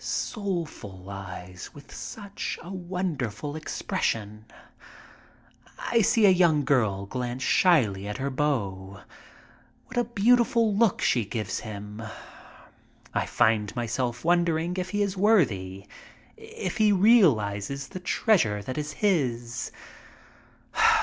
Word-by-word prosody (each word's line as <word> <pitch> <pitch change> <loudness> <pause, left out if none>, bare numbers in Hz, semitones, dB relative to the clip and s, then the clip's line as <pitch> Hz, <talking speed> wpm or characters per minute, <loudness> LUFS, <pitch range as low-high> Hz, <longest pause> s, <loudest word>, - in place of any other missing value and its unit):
Soulful 160 - -4
eyes 90 -2 -8
with 145 -1 -13
such 200 -2 -6
a 175 - -9
wonderful 170 - -3
expression. 110 -8 -3 1.3
I 235 - +1
see 220 +1 +4
a 195 - +8
young 170 -6 +3
girl 110 -8 +1
glance 125 +3 -4
slyly 110 - +3
at 105 - -4
her 140 +1 -2
beau. 100 -9 -2 0.8
What 250 - -9
a 240 - +4
beautiful 230 -1 +3
look 220 -2 +2
she 120 - +3
gives 110 +1 -3
him! 105 0 -8 1.1
I - - 0
find 110 -3 +2
myself 120 +2 -2
wondering 170 0 +2
if 185 0 -2
he 205 +1 +1
is 200 -1 -2
worthy, 110 - +2 0.5
if 445 - -6
he 215 -2 +4
realizes 140 - +3
the 185 - -7
treasure 165 - +2
that 130 +7 -4
is 150 0 -4
his. 125 - -1
140 Hz, 115 wpm, -26 LUFS, -, 1.3 s, a